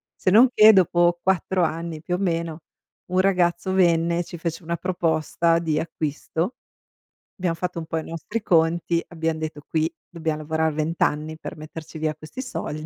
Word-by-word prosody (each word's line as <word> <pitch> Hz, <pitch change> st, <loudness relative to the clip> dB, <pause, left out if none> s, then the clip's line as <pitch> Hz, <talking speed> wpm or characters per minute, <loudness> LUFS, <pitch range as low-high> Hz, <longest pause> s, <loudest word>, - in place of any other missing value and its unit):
Se 185 Hz, -, 0 dB
non 240 Hz, +5 st, +7 dB
che 215 Hz, +1 st, +9 dB
dopo 175 Hz, -2 st, +3 dB
4 190 Hz, -1 st, +1 dB
anni 165 Hz, -1 st, -3 dB
più 175 Hz, +2 st, -4 dB
o -, -, -1 dB
meno 170 Hz, -3 st, -1 dB, 0.5 s
un 185 Hz, -, +2 dB
ragazzo 185 Hz, -1 st, +2 dB
venne 170 Hz, -2 st, +3 dB
e 175 Hz, -, 0 dB
ci 170 Hz, -, -9 dB
fece 165 Hz, +1 st, -4 dB
una 170 Hz, +1 st, -2 dB
proposta 165 Hz, -1 st, +1 dB
di 155 Hz, -2 st, 0 dB
acquisto. 160 Hz, -, -3 dB, 0.8 s
Abbiamo 180 Hz, -2 st, 0 dB
fatto 180 Hz, +1 st, -4 dB
un 160 Hz, -, -6 dB
po' 165 Hz, -, -3 dB
i 160 Hz, -, -2 dB
nostri 165 Hz, +8 st, -4 dB
conti, 170 Hz, -1 st, +2 dB
abbiamo 160 Hz, -1 st, -2 dB
detto: 155 Hz, -2 st, -5 dB
"Qui 160 Hz, +1 st, 0 dB, 0.2 s
dobbiamo 160 Hz, -2 st, -3 dB
lavorare 160 Hz, 0 st, 0 dB
20 155 Hz, +2 st, 0 dB
anni 155 Hz, +1 st, -1 dB
per -, -, -8 dB
metterci 155 Hz, +1 st, -9 dB
via 155 Hz, -1 st, -1 dB
questi 155 Hz, +11 st, -8 dB
soldi", 155 Hz, -, -5 dB
165 Hz, 175 wpm, -24 LUFS, 160-175 Hz, 0.8 s, che